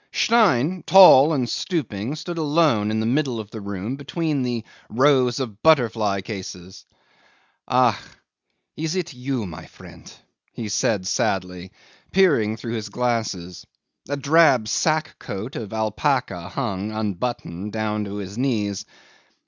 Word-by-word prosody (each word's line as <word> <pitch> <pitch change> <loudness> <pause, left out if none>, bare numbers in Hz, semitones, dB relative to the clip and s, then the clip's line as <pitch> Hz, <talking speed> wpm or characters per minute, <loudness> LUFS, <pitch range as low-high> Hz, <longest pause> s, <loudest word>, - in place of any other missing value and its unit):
'Stein, 185 - +2
tall 165 -6 +8
and 130 -6 0
stooping, 130 - -3
stood 170 +2 -6
alone 150 -9 +2
in 110 0 -1
the 110 - -1
middle 130 -1 0
of 110 -1 -8
the 110 - -7
room 100 +4 -4
between 150 0 -2
the 120 -3 -2 0.3
rows 130 0 +3
of 115 -6 -5
butterfly 115 -10 +3
cases. 95 -2 -8 0.8
"Ach! 125 -2 +4 0.8
is 160 +3 -3
it 175 -4 -3
you, 125 -2 -3
my 80 -3 -9
friend?" - - -14 0.4
he 110 -3 -5
said 100 -1 0
sadly, 90 -1 -2 0.4
peering 140 - +3
through 115 +2 -6
his 110 -2 -4
glasses. 105 -7 -3 0.4
A 145 - -1
drab 140 -5 +4
sack 155 +7 0
coat 105 +7 -6
of 110 -4 -6
alpaca 110 - -1
hung, 105 -5 -3
unbuttoned, 105 -2 -4
down 105 -1 -2
to 100 0 -6
his 100 +2 -6
knees. 105 -7 -1
115 Hz, 130 wpm, -22 LUFS, 105-145 Hz, 0.8 s, tall